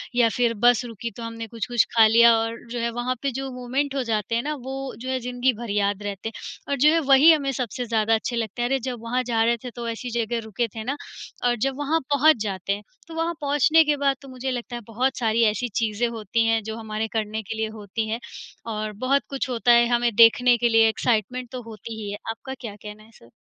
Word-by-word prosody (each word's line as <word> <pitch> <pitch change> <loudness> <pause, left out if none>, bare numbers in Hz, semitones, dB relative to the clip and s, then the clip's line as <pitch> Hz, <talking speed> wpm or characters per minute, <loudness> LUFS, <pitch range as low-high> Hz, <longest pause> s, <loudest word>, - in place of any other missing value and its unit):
या 235 -2 +4
फिर 240 -2 +2
बस 245 0 +5
रुकी 230 0 -6
तो 235 - -6
हमने 230 0 -6
कुछ-कुछ 235 +1 0
खा 225 -1 +8
लिया। 235 +1 +7
और 225 +1 -2
जो 240 - -3
है 235 0 0
वहाँ 240 +2 -2
पे 275 -1 -1
जो 270 +2 -4
मोमेंट 260 +3 -2
हो 265 - 0
जाते 225 0 -1
हैं 235 - 0
ना, 300 +1 -2
वो 265 0 -6
जो 255 +2 -6
है 260 -1 0
ज़िन्दगी 250 +1 0
भर 230 0 -7
याद 205 0 0
रहते 205 +2 -4
हैं, - - -16 0.4
और 280 - +1
जो 295 +4 +5
है 330 - +3
वही 280 +5 +8
हमें 280 -3 +2
सबसे 245 -1 -3
ज़्यादा 225 -1 +1
अच्छे 235 +2 -3
लगते 225 0 -3
हैं, 240 - 0
"अरे 270 0 +1
जब 245 -2 -5
वहाँ 250 +2 0
जा 230 -2 +1
रहे 235 +1 +2
थे, 250 - -5
तो 235 0 -6
ऐसी 235 +2 -5
जगह 230 +1 -1
रुके 230 +2 -2
थे 220 - -5
ना।" 275 +4 -2 0.5
और 240 0 +3
जब 270 0 -4
वहाँ 300 +3 0
पहुँच 300 0 +5
जाते 195 -1 -2
हैं, 205 +1 -6 0.2
तो 330 - -10
वहाँ 330 +1 -1
पहुँचने 295 +3 +4
के 295 -1 +1
बाद 275 -1 +3
तो 275 - -13
मुझे 260 +1 -4
लगता 245 0 -5
है 240 - -5
बहुत 255 +4 -1
सारी 230 -1 +2
ऐसी 240 +4 -3
चीज़ें 225 +1 0
होती 225 0 -1
हैं 225 0 +2
जो 220 +1 -5
हमारे 220 0 -3
करने 220 -1 -2
के 220 - -6
लिए 220 0 0
होती 215 +2 -4
हैं, 225 - -2 0.5
और 215 -1 -3
बहुत 275 +2 +3
कुछ 270 -1 -3
होता 240 0 +2
है 235 0 +6
हमें 235 -1 +1
देखने 240 +2 +6
के 240 +1 +2
लिए, 225 -1 +5
एक्साइटमेंट 240 +2 -1
तो 255 -1 -5
होती 220 0 -8
ही 205 -1 -5
है। 205 - -5
आपका 265 +4 -6
क्या 215 -4 -6
कहना 210 +1 -11
है 225 - -20
सर? 115 - -19
235 Hz, 250 wpm, -24 LUFS, 220-255 Hz, 0.5 s, खा